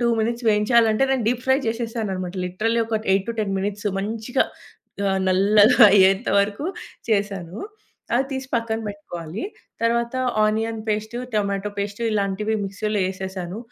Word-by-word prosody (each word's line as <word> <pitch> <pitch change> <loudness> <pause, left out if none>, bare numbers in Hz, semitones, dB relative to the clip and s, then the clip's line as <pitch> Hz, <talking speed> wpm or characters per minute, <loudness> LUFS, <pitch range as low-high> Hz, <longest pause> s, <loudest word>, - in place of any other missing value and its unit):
2 240 - +2
minutes 235 +2 -2
వేయించాలి 225 +2 +4
అంటే, 245 +5 +2
నేను 260 -5 +1
డీప్ 245 0 -1
ఫ్రై 265 0 +5
చేసేసానన్నమాట. 225 -6 -3
లిటరల్లీ 225 +6 0
ఒక 220 -1 -1
8-10 205 +1 0
మినిట్స్ 205 +1 -3
మంచిగా 220 +5 -1 0.7
ఆహ్, 190 0 0
నల్లగా 205 +6 +5
అయ్యేంత 195 -1 +4
వరకు 205 +8 0 0.4
చేశాను. 200 -3 -1 0.6
అది 265 +2 +2
తీసి 265 -1 -4
పక్కన 230 -1 0
పెట్టుకోవాలి. 180 - -6 0.4
తర్వాత 235 +1 +1 0.3
ఆనియన్ 220 +1 0
పేస్టు, 215 +3 -2 0.2
టొమాటో 200 0 -1
పేస్టు 205 +3 -3
ఇలాంటివి 210 +1 0
మిక్సీలో 210 +2 -2
వేసేశాను. 190 0 -5
215 Hz, 130 wpm, -23 LUFS, 195-230 Hz, 0.7 s, ఫ్రై